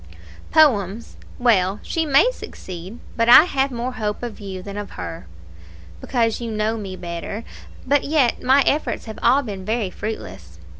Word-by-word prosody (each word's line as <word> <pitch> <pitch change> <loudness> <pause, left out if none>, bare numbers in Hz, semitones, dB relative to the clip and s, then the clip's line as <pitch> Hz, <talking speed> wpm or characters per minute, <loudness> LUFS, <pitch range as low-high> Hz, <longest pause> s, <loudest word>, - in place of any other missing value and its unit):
"Poems 230 - +2 0.2
well, 205 -5 +2
she 325 -1 -1
may 285 - +5
succeed; 185 - -9 0.2
but 230 0 +1
I 245 - +10
have 275 -5 0
more 245 0 -3
hope 215 -3 -4
of 235 -3 -6
you 190 -3 -7
than 200 0 -8
of 205 -1 -6
her." 165 - -7 0.7
"Because 230 -3 0
you 235 - -4
know 215 +1 -1
me 195 -4 -6
better; 175 +4 -6 0.4
but 280 +1 +2
yet 280 -5 +1
my 270 +2 +4
efforts 300 - 0
have 220 -1 -8
all 270 +4 +4
been 200 -5 -6
very 215 -1 -1
fruitless. 90 - -7
225 Hz, 160 wpm, -21 LUFS, 195-255 Hz, 0.7 s, I